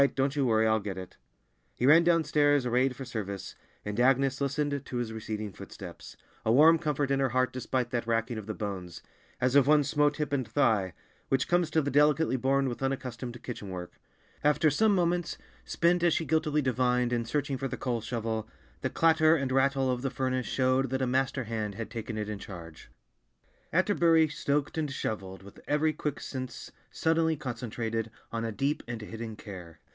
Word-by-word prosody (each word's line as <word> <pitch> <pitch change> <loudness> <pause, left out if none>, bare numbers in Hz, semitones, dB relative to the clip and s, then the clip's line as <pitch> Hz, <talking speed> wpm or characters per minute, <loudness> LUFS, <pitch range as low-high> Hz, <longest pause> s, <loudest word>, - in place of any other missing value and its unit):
Don't 135 +1 +1
you 140 -3 +1
worry, 110 -1 +3
I'll 110 0 +3
get 100 -2 -5
it." 95 -1 -9 0.6
He 125 - -1
ran 160 +5 +7
downstairs, 150 -5 +3
arrayed 125 +2 +2
for 135 - -7
service, 100 -5 -5 0.3
and 105 +2 -3
Agnes 135 +2 +3
listened 140 0 -1
to 125 - -5
his 120 -2 -3
receding 110 -2 -5
footsteps, - - -10 0.3
a 110 - +2
warm 160 +6 +7
comfort 145 -2 -1
in 135 - +2
her 135 -1 +2
heart 130 +1 +1
despite 125 -1 -2
that 120 -1 -2
racking 115 0 0
of 105 - -10
the 110 - -4
bones, 95 -5 -6 0.4
as 130 0 +1
of 140 -1 +5
one 150 0 +5
"smote 145 +1 +1
hip 150 -1 -2
and 130 -4 0
thigh," 110 - +2 0.4
which 135 -1 +1
comes 175 -2 +2
to 160 -1 +2
the 145 - -2
delicately 150 +1 +3
born 135 +2 +1
with 120 0 -4
unaccustomed 125 -3 -4
kitchen 110 -5 -6
work. 90 -1 -7 0.4
After 150 +1 +4
some 210 +7 +3
moments—spent, 175 0 0
as 170 -2 +3
she 165 - -1
guiltily 150 0 +1
divined, 125 -1 +1
in 120 -1 +1
searching 135 +2 -2
for 135 - -2
the - - -5
coal 120 -3 -2
shovel—the 110 -1 -5
clatter 160 -1 +4
and 135 -4 -1
rattle 135 0 +2
of 125 -1 -2
the 135 - -1
furnace 130 -1 -2
showed 130 0 +1
that 130 +1 -1
a - - +1
master 130 +1 0
hand 110 -2 -3
had 115 +1 -6
taken 110 -2 -5
it 105 -1 -3
in 105 -1 -5
charge. 85 -6 -10 0.8
Atterbury 165 -4 +4
stoked 145 0 -1
and 150 -2 -1
shoveled 95 -8 -4
with 100 - -14
every 155 +1 +2
quick 150 -1 -3
sense 130 -3 -6 0.2
suddenly 160 -1 +1
concentrated 115 -3 -3 0.2
on 115 0 -2
a 115 - -2
deep 135 +8 -1
and 120 -2 -4
hidden 110 +1 -7
care. 90 -6 -10
130 Hz, 185 wpm, -29 LUFS, 115-145 Hz, 0.8 s, ran